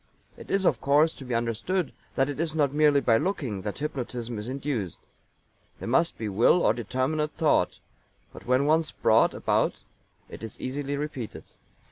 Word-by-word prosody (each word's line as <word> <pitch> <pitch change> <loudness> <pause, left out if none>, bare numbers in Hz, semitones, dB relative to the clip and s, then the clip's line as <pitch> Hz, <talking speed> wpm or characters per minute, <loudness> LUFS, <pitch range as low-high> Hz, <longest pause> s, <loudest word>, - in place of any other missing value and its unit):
It - - -12
is, 195 -1 +1
of 125 -9 +2
course, 150 +4 +4
to - - -11
be 125 -2 -2
understood 120 - -1 0.2
that 135 - +2
it 145 0 -5
is 160 -1 -1
not 145 -3 +2
merely 150 -1 +4
by 115 -4 +4
looking 140 - -2
that 105 +1 -5
hypnotism 125 -5 -4
is 105 - -6
induced. 130 - -3 0.8
There - - -7
must 165 +8 +2
be 110 - -3
will 115 - +4
or - - +5
determinate 130 +7 -1
thought; 150 - +2 0.6
but - - -12
when 130 +2 +3
once 155 +1 +2
brought 110 +1 +3
about - - +1 0.5
it - - -10
is 110 0 -8
easily 140 +2 -3
repeated. 140 -6 -6
135 Hz, 170 wpm, -27 LUFS, 115-150 Hz, 0.8 s, or